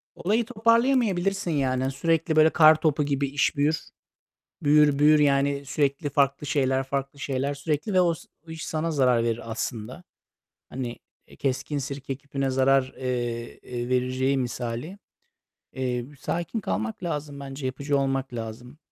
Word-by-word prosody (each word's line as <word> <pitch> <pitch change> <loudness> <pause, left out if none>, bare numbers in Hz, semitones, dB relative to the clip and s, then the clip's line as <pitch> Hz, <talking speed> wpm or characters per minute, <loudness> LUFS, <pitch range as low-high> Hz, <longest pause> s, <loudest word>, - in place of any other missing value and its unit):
Olayı 215 +6 +1
toparlayamayabilirsin 225 -5 +2
yani. 130 -3 0
Sürekli, 165 +3 0
böyle, 155 0 +6
kartopu 155 -2 +5
gibi 140 -1 0
iş 145 +1 +1
büyür. 150 +3 0 0.7
Büyür, 145 -1 +5
büyür, 150 +1 +6
yani, 140 -1 +2
sürekli 140 +1 -1
farklı 140 +1 +1
şeyler, 135 -1 +1
farklı 140 +1 -3
şeyler 140 0 -1
sürekli 150 +6 -2
ve 185 - +5
o 170 -2 +3
s - - -15 0.2
iş 160 0 -6
sana 160 +1 -1
zarar 125 -6 +3
verir 115 0 -2
aslında. 115 +6 -5 0.6
Hani, 125 -2 -5 0.3
e, - - -17
"keskin 135 +2 -2
sirke 135 0 -5
küpüne 135 -1 -3
zarar," 130 0 +3
eee, 120 -2 -3
eee, 120 0 -5
vereceği 130 +2 +1
misali. 125 +7 -4 0.8
Eee, 125 -2 -2
b - - -16
sakin 175 - -3
kalmak 110 - -3
lazım 150 -4 -4
bence, 135 0 -7
yapıcı 140 +2 -1
olmak 135 -1 -1
lazım. 115 +4 -7
140 Hz, 145 wpm, -26 LUFS, 130-155 Hz, 0.8 s, böyle